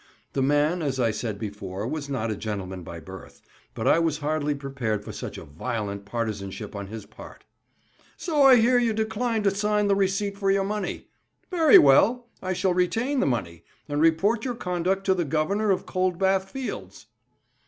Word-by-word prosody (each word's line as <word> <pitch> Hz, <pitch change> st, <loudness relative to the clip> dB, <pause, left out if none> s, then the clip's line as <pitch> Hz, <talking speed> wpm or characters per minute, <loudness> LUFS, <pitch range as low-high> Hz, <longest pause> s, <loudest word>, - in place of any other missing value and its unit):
The 135 Hz, -, 0 dB
man, 145 Hz, +5 st, +2 dB
as 135 Hz, -4 st, -2 dB
I 115 Hz, -3 st, +2 dB
said 110 Hz, -1 st, -4 dB
before, 100 Hz, -1 st, -5 dB
was 145 Hz, +1 st, -4 dB
not 115 Hz, -5 st, -2 dB
a -, -, -2 dB
gentleman 95 Hz, -3 st, -5 dB
by 85 Hz, 0 st, -8 dB
birth, 95 Hz, +4 st, -11 dB, 0.4 s
but -, -, -2 dB
I -, -, +5 dB
was 165 Hz, -3 st, +1 dB
hardly 150 Hz, -1 st, -1 dB
prepared 130 Hz, -7 st, -3 dB
for -, -, -6 dB
such -, -, -7 dB
violent 100 Hz, -, -5 dB
partizanship 105 Hz, -2 st, -4 dB
on 100 Hz, -1 st, -5 dB
his 110 Hz, 0 st, -8 dB
part. -, -, -13 dB, 0.7 s
"So 310 Hz, -5 st, 0 dB
I 270 Hz, -2 st, +8 dB
hear 245 Hz, +1 st, +4 dB
you 235 Hz, -2 st, +1 dB
decline 220 Hz, +1 st, -1 dB
to 200 Hz, -, +3 dB
sign 210 Hz, +1 st, +1 dB
the 200 Hz, -, +3 dB
receipt 200 Hz, +1 st, 0 dB
for 195 Hz, -1 st, +1 dB
your 195 Hz, 0 st, +3 dB
money. 205 Hz, 0 st, -4 dB, 0.4 s
Very 325 Hz, -5 st, +7 dB
well; 230 Hz, -, +4 dB
I 185 Hz, 0 st, -2 dB
shall 185 Hz, 0 st, +1 dB
retain 225 Hz, +10 st, 0 dB
the -, -, +2 dB
money, 85 Hz, -10 st, -2 dB, 0.2 s
and 145 Hz, 0 st, -1 dB
report 195 Hz, +8 st, +3 dB
your 250 Hz, -2 st, -2 dB
conduct 185 Hz, -1 st, -1 dB
to 190 Hz, -, +4 dB
the 180 Hz, -2 st, 0 dB
Governor 165 Hz, +8 st, 0 dB
of 190 Hz, -, +1 dB
Cold 185 Hz, -1 st, 0 dB
Bath 190 Hz, 0 st, +1 dB
Fields." 265 Hz, +4 st, -6 dB
165 Hz, 185 wpm, -25 LUFS, -, 0.7 s, I